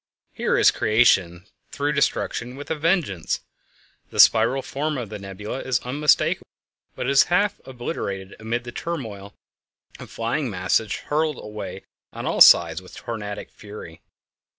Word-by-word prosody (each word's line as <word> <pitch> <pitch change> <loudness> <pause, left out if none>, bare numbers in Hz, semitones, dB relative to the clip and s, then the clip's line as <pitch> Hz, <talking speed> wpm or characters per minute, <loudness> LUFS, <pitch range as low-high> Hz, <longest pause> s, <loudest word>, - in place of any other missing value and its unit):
_ - - -40
Here - - +1
is - - +6
creation 95 -6 +2 0.3
through 145 +1 -1
destruction 125 -3 -1
with 145 +3 -8
a - - +1
vengeance! 155 - 0 0.7
The - - -7
spiral 120 +4 +5
form 150 +1 -3
of 120 -5 -5
the 105 - -7
nebula 100 +5 -6
is 130 -2 0
unmistakable, 145 +4 +1 0.5
but - - -4
it 135 - +1
is 140 - +6
half 200 +4 +1
obliterated 105 - -5
amid 115 +2 -3
the 120 - -8
turmoil 110 -11 -6 0.6
of - - -10
flying 120 +4 -2
masses 95 +2 0
hurled 155 -1 -1
away 105 0 -7 0.3
on - - -7
all - - -1
sides 85 0 +7
with 90 - -14
tornadic 105 -3 -6
fury. 100 -6 -11
120 Hz, 150 wpm, -23 LUFS, 100-140 Hz, 0.7 s, sides